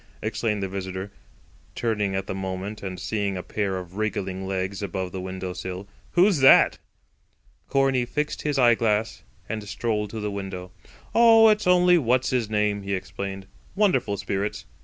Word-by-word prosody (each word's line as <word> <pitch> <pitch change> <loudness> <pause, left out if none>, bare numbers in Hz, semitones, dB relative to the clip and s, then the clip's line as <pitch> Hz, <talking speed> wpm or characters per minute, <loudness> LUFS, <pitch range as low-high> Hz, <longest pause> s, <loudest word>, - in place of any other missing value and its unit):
exclaimed 110 -1 -1
the - - -1
visitor, 95 +1 -5 0.6
turning 105 -4 -1
at 95 0 -2
the - - -4
moment 95 +2 -5
and 95 -2 -5
seeing 100 +1 -2
a 90 - -5
pair 100 -3 -2
of 90 +1 -8
wriggling 95 -3 -2
legs 95 +1 -3
above 95 -2 -3
the 95 - -5
window 95 0 -5
sill; 95 +2 -6 0.3
"who's 180 -2 +4
that?" 135 - +6 0.9
Corney 135 -2 +2
fixed 150 +5 -3
his 150 -2 -1
eyeglass 115 -3 +2 0.3
and 110 -1 -4
strolled 105 -1 -2
to 110 - -6
the 105 -1 -3
window. 95 -2 -6 0.4
"Oh, 225 -1 +7
it's 210 -2 +2
only 180 -1 +5
What's 125 -1 +1
his 120 -4 0
name," 105 -1 0
he 100 0 -2
explained. 95 +1 -6 0.3
"Wonderful 190 - +2
spirits. 100 +2 -3
100 Hz, 160 wpm, -25 LUFS, 95-120 Hz, 0.9 s, Oh